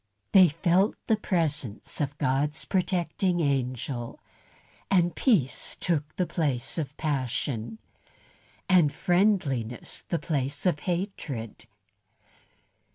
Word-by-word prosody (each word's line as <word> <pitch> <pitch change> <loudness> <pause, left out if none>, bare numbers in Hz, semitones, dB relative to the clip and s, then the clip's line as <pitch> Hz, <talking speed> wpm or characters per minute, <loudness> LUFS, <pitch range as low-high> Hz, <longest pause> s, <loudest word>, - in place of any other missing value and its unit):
They 185 -3 +8
felt 180 +6 +2
the 220 - +3
presence 155 - -2
of 145 0 -2
God's 145 +1 0
protecting 180 -1 0
angel, 130 -4 -2 0.7
and 175 -3 +3
peace 185 - +1
took 155 -4 -1
the 180 - +1
place 145 -4 -1
of 145 -2 -4
passion, 125 -6 -2 0.9
and 175 -6 +5
friendliness 160 - 0
the 170 - -2
place 140 -2 -2
of 175 -5 +2
hatred. 150 - -4
150 Hz, 95 wpm, -27 LUFS, 130-180 Hz, 0.9 s, They